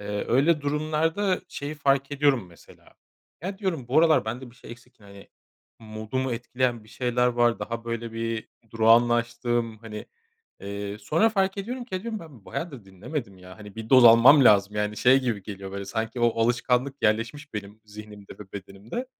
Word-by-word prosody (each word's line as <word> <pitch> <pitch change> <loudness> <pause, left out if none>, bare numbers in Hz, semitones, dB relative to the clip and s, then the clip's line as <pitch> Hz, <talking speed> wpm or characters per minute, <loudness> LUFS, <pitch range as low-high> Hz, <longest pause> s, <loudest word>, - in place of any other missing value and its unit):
Eee, 105 0 -4
öyle 150 +6 +3
durumlarda 155 +6 0
şeyi 145 +2 -6
fark 140 -1 +1
ediyorum 140 -7 +2
mesela, 85 - -19 0.5
ya, 190 +2 -5
diyorum 170 - -3
bu 135 - +3
aralar 160 -9 +4
bende 120 +3 -6
bir - - -21
şey - - -13
eksik, 120 +1 -15
hani, 100 -1 -15 0.5
modumu 110 +4 -4
etkileyen 120 -1 -2
bir - - -19
şeyler 125 +1 0
var, 120 -1 +2
daha 115 0 -5
böyle 115 -1 -4
bir 115 0 -4 0.2
durağanlaştım. 120 0 +2
Hani, 105 -1 -9 0.5
eee, 100 +1 -6
sonra 155 - +2
fark 195 -2 0
ediyorum 245 +5 -5
ki, 225 -6 -4
ha, 185 - -6
diyorum 225 -1 -4
ben 140 -11 -14
bayağıdır 140 - -6
dinlemedim 100 - -7
ya, 90 +1 -13
hani, 105 -2 -11
1 110 0 -7
doz 130 -2 +7
almam 120 +5 +8
lazım. 105 -2 +4
Yani, 105 0 -1
şey, 125 +4 +5
gibi 115 -6 -2
geliyor 95 -1 -8
böyle 100 0 -5
sanki 110 +4 -4
o 115 -1 +2
alışkanlık 125 +3 0
yerleşmiş 115 +7 -1
benim 105 +1 -7
zihnimde 105 -1 -11
ve 100 -2 -12
bedenimde. 100 - -7
120 Hz, 170 wpm, -25 LUFS, 105-140 Hz, 0.5 s, almam